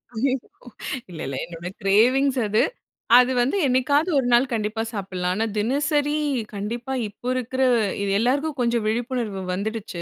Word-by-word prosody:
ஐய்ய்யோ! 260 +4 +1 0.8
இல்ல 165 - -9
இல்ல. 135 - -4
என்னோட 170 0 -8 0.2
கிரேவிங்ஸ் 255 +7 +3
அது 215 +2 +2 0.6
அது 250 +1 +5
வந்து 265 +10 +1
என்னைக்காவது 285 +6 +2
ஒரு 250 - -1
நாள் 240 +2 +5
கண்டிப்பா 220 0 -1
சாப்பிடலாம். 185 -3 -2
ஆனா 220 +3 0
தினசரி 290 +6 +1 0.4
கண்டிப்பா 235 +6 -4 0.2
இப்போ 225 +4 -10
இருக்குற 255 +1 -2 0.4
இது 200 - -1
எல்லோருக்கும் 280 +6 0
கொஞ்சம் 235 -1 +1
விழிப்புணர்வு 230 -3 -2
வந்துடுச்சு. 205 -2 -4
235 Hz, 140 wpm, -23 LUFS, 205-265 Hz, 0.8 s, அது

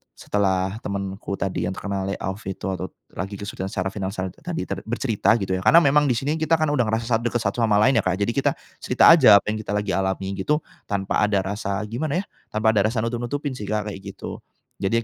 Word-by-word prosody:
setelah 95 0 0
temenku 100 -1 -4
tadi 95 -2 -2
yang 95 - -3
terkena 100 -1 -3
layoff 95 0 -3
itu 95 - -5
atau 95 0 -3 0.3
lagi 95 +2 -3
kesulitan 100 -2 -5
secara 95 0 -2
finansial 95 -2 -4
tadi 170 -1 -5
ter 95 -1 -3
bercerita 115 -2 +2
gitu, 95 -1 -1
ya, - - -6
karena 165 +10 +7
memang 145 +1 +4
di 125 - +2
sini 150 +5 -1
kita 160 +1 +3
kan 155 -2 +1
udah 130 -5 +2
ngerasa 110 +1 0
sangat 115 -1 +1
dekat 120 - 0
satu 100 +3 -1
sama 105 -2 +3
lain 130 -3 +4
ya, - - -1
Kak, 90 0 +2
jadi 115 - 0
kita 135 - +1 0.3
cerita - - +6
aja 130 -11 +8
apa - - -21
yang 110 - -2
kita 105 - -5
lagi 105 -1 -1
alami 95 +1 -1
gitu, 150 +9 0 0.2
tanpa 95 -1 -1
ada 100 -2 +2
rasa 100 +1 -3
gimana 155 - -2
ya, - - -20 0.3
tanpa 110 +1 +3
ada 105 -1 +3
rasa 110 -1 -1
nutup-nutupin 120 +5 -2
sih 105 - -6
Kak, 105 -1 -2
kayak 95 - -8 0.2
gitu. - - -7 0.4
Jadi 115 +4 +1
105 Hz, 225 wpm, -23 LUFS, 95-120 Hz, 0.4 s, aja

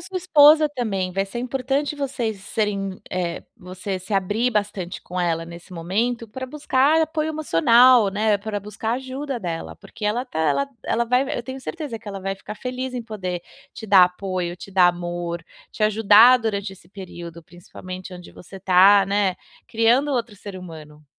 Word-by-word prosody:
sua 380 - -7
esposa 310 -3 +6
também. 200 -9 -3
Vai 195 +1 -1
ser 220 +5 -6
importante 270 +4 -2
vocês 245 -7 -3
serem 195 -2 -3
eh, 175 -2 -3
você 185 0 -6
se 190 +3 -5
abrir 205 +6 +1
bastante 205 -4 -3
com 180 0 -5
ela 165 -1 0
nesse 170 +2 -12
momento 220 +8 -2
para 260 +4 -6
buscar 290 +2 +2
apoio 315 -1 -2
emocional, 245 - +5
né, 210 +1 +1
para 205 0 -4
buscar 210 +2 -4
ajuda 265 +1 -4
dela, 170 -4 -5
porque 215 - -10
ela 235 +5 0
tá 245 - -7
ela 160 - +1 0.2
ela 235 +1 0
vai 250 +3 +2
v 290 - -4
eu 240 - -3
tenho 260 +2 -7
certeza 285 -5 -6
que 215 - -11
ela 195 -1 -6
vai 195 +1 -3
ficar 210 - -9
feliz 255 +2 -5
em 245 - -3
poder 185 -6 -5 0.3
te 220 - -8
dar 190 -2 +7
apoio, 180 -1 -4
te 195 - -11
dar 185 -2 +5
amor, 175 -1 -4 0.3
te 215 - -6
ajudar 220 +3 +6
durante 205 -4 -3
esse 175 -2 -17
período, 175 -3 -10
principalmente, 185 +2 -10
onde 180 -1 -12
você 190 +2 -12
tá, 195 +2 +6
né, 200 -1 +1 0.3
criando 240 +5 +2
outro 230 -4 -2
ser 200 -1 -9
humano. 155 -4 -11
205 Hz, 180 wpm, -22 LUFS, 185-250 Hz, 0.3 s, dar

